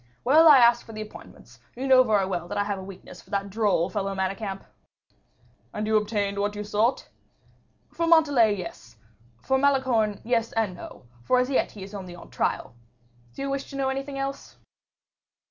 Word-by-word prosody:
Well, 310 +6 +6
I 295 -3 +9
asked 235 -1 +5
for 225 - -11
the 215 - -6
appointments, 215 - -14
for - - -16
you 270 - -2
know 260 -1 +7
very 215 -6 +2
well 175 -2 -4
that - - -5
I 205 - +2
have 200 -1 -3
a - - -8
weakness 190 -1 -11
for - - -24
that 200 0 -3
droll 200 -5 +1
fellow 195 -2 -3
Manicamp." 195 +1 -3 1.1
"And 210 - -2
you 220 0 +1
obtained 205 -2 0
what 205 +1 -1
you 210 - -4
sought?" 210 +4 0 0.9
"For 335 0 -1
Montalais, 290 -10 +4
yes; 170 - -9 0.5
for 265 0 +1
Malicorne, 260 -7 +1
yes 230 -1 0
and 220 -4 0
no; 175 - -11 0.2
for 255 - +2
as 250 +2 +1
yet 265 - 0
he 200 - -9
is 195 +2 -11
only 185 -3 -8
on 175 - -14
trial. - - -2 0.6
Do - - -5
you 275 - -2
wish 275 0 -4
to - - -9
know 270 -1 0
anything 275 +1 -4
else?" 275 0 -5
215 Hz, 195 wpm, -25 LUFS, 200-265 Hz, 1.1 s, I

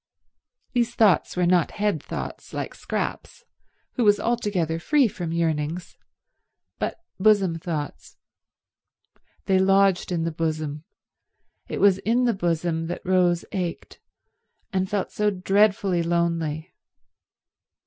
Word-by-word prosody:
These 240 -1 0
thoughts 205 -4 +3
were 180 - +3
not 175 -2 +2
head 205 -7 0
thoughts, - - -7
like - - -4
Scrap's, - - -4 0.5
who 245 - +2
was 205 -1 +5
altogether 200 -9 -1
free 280 - +3
from 175 -5 -5
yearnings, 165 0 -2 0.8
but - - -3 0.2
bosom 195 -5 +3
thoughts. 160 -4 -5 1.3
They 190 -1 +3
lodged 195 -1 +3
in 170 -2 0
the 165 - -1
bosom; 155 -1 -3 0.8
it - - -4
was 195 -2 +5
in 230 +5 +1
the 240 -2 +3
bosom 165 -3 -1
that 175 - -6
Rose 180 -2 +2
ached, 180 -4 -4 0.7
and 190 0 0
felt 205 -2 -2
so 210 0 +1
dreadfully 195 -1 +2
lonely. 170 -1 -1
180 Hz, 120 wpm, -24 LUFS, 165-205 Hz, 1.3 s, was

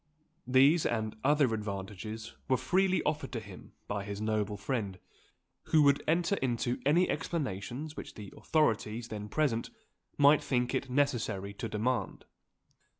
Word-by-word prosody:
These, 135 +6 +5
and 110 -2 -2
other 145 -3 +3
advantages, 105 +2 -5 0.2
were 130 - +4
freely 190 +4 +2
offered 150 -3 -1
to 115 - -1
him 100 -4 -12
by 100 -1 -2
his 100 0 -5
noble 105 -1 -1
friend, 100 -3 -3 0.7
who 155 -1 +4
would 140 -1 +4
enter 175 +4 +2
into 120 -1 -1
any 175 +5 +4
explanations 140 - -3
which - - -8
the 105 -3 -9
authorities 115 -6 0
then 105 -1 -6
present 125 -4 0 0.5
might 145 +1 +6
think 125 -1 0
it 130 0 -1
necessary 120 -8 0
to 115 +3 -5
demand. 115 +4 -2
120 Hz, 140 wpm, -31 LUFS, 105-145 Hz, 0.7 s, might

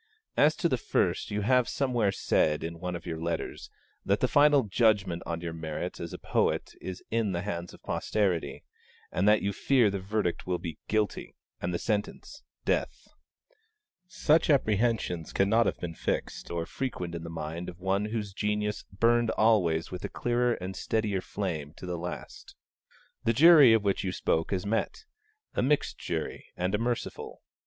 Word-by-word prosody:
As 150 +2 +4
to 170 - +1
the 130 -6 0
first, - - 0
you 105 0 -1
have 125 +3 +3
somewhere 120 -7 +1
said, 75 -5 +1
in 85 0 -5
one 90 0 -3
of 85 - -7
your 80 -2 -4
letters, 85 -1 -3 0.3
that - - +1
the - - +2
final 145 -1 +5
judgment 100 -4 +2
on 85 0 -3
your 85 -1 -4
merits 80 -2 -5
as - - -5
a - - -6
poet - - 0
is 95 -1 -6
in 110 -4 +1
the 85 +1 -2
hands 90 -4 -4
of - - -16
posterity, 90 -10 -1 0.5
and 95 +3 +1
that 105 0 +5
you 100 0 0
fear 120 -2 +3
the 100 - -2
verdict 95 -2 -2
will 90 -1 0
be 85 -3 -7
'Guilty,' 110 -1 -1 0.3
and 85 - -1
the 85 - 0
sentence 105 +2 -3 0.2
'Death.' - - -1 1.0
Such 160 -2 +2
apprehensions 110 - +1
cannot 105 +3 +3
have - - -1
been 85 -1 -4
fixed - - -3
or 85 -1 -2
frequent 90 -7 -4
in 85 -1 -5
the 85 - -6
mind 80 +1 -5
of 90 - -11
one 95 +2 0
whose 105 -2 -4
genius 105 +1 -1
burned 115 +3 +3
always 95 -9 +2
with 90 0 -6
a - - -3
clearer 120 0 +1
and 95 +1 -6
steadier 105 -2 -1
flame 80 -8 -4
to - - -9
the 90 -1 -3
last. 90 +1 -7 0.7
The 115 - +3
jury 150 -2 +8
of 110 -2 +4
which 100 -1 0
you 95 - -1
spoke 80 -2 0
has 95 -1 -1
met: 115 - -2 0.5
a - - 0
mixed 145 +3 +1
jury - - -4
and 90 +2 -1
a 105 - +1
merciful. 120 +1 -3
100 Hz, 180 wpm, -29 LUFS, 85-115 Hz, 1.0 s, jury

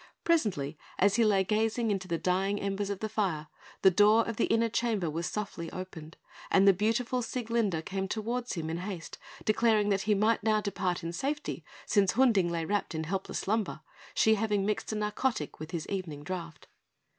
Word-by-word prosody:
Presently, 185 - +1 0.2
as 200 +3 +3
he 235 - +5
lay 200 -3 +4
gazing 220 +3 +1
into 190 -2 -2
the 170 -2 -1
dying 190 +4 0
embers 200 0 -2
of 200 -2 -4
the 220 - -1
fire, 190 -8 -1 0.3
the 190 - +8
door 210 +4 +5
of 230 -2 -4
the - - +3
inner 230 0 +2
chamber 220 -7 0
was 165 +1 -2
softly 200 -5 -4
opened, 170 -3 -8 0.3
and 195 +1 +5
the 195 - +8
beautiful 230 +6 0
Sieglinde 225 -8 -1
came 190 0 -2
towards 235 +4 -2
him 160 -3 -3
in 165 - -2
haste, 180 -2 -6 0.3
declaring 215 -1 +3
that 195 -1 +2
he 210 - +5
might 215 +3 +2
now 215 -1 +2
depart 185 -4 -2
in 165 +1 -4
safety, 290 - -3 0.2
since 200 -3 +3
Hunding 225 -9 +4
lay 165 -1 -2
wrapped 200 -2 -1
in 160 - -2
helpless 190 +4 -3
slumber, 205 -6 -1 0.3
she 220 - +5
having 210 -2 +1
mixed 210 +1 -1
a - - -2
narcotic 210 - -1
with 155 +1 -7
his 170 -3 -4
evening 170 -7 -4
draught. 170 -1 -6
200 Hz, 190 wpm, -30 LUFS, 180-220 Hz, 0.3 s, the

